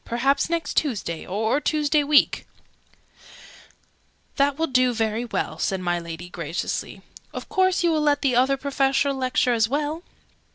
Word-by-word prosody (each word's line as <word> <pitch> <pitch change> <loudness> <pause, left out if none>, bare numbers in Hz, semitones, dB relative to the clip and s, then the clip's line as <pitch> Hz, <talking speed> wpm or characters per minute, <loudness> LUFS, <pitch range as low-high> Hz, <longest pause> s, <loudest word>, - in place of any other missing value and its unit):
Perhaps 270 +6 0
next 335 -1 -2
Tuesday 205 - -2
or 220 +9 0
Tuesday 300 0 +1
week 290 0 +3 0.9
" - - -24
"That 280 -1 +2
will 325 - +1
do 255 -3 +2
very 225 +1 -1
well," 235 - -3
said 190 -2 -1
my 175 -1 -1
Lady, 170 +1 -8
graciously. 170 -2 -5 0.3
"Of - - -7
course 375 -1 +2
you 340 - +3
will 310 -1 +1
let 295 -1 +1
the 260 -3 +2
Other 265 +3 +3
Professor 275 0 +1
lecture 255 -1 +1
as 225 -1 +2
well?" 295 +4 -2
270 Hz, 155 wpm, -23 LUFS, 220-295 Hz, 0.9 s, week